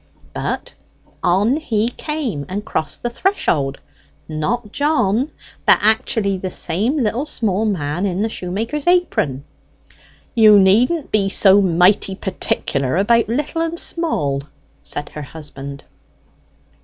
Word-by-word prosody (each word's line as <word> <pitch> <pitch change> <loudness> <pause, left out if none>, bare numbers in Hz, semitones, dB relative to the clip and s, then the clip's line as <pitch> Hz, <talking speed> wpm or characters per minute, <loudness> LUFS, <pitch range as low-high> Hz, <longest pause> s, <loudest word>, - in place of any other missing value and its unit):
But - - -4 0.5
on 205 +10 +2
he 230 -7 0
came, 250 - -4
and 205 +3 -4
crossed 155 - -3
the 240 - 0
threshold 155 - 0 0.5
not 210 +9 -2
John, 275 -4 +1 0.3
but - - +6
actually 215 -2 +1
the 185 - -3
same 200 - -1
little 235 +7 -1
small 215 -6 +1
man 175 -2 -1
in 190 +2 -1
the - - +1
shoemaker's 225 - -4
apron 350 - +1 0.5
" - - -28 0.3
"You 215 -3 +7
needn't 240 - +3
be 200 -2 +2
so 195 0 +5
mighty 185 +2 +3
particular 140 -7 -1
about 230 +3 +3
little 295 +6 -1
and 330 +1 -2
small!" 150 - -1 0.4
said 145 - -5
her 150 - -8
husband. 140 -1 -8
205 Hz, 125 wpm, -19 LUFS, 175-240 Hz, 0.5 s, You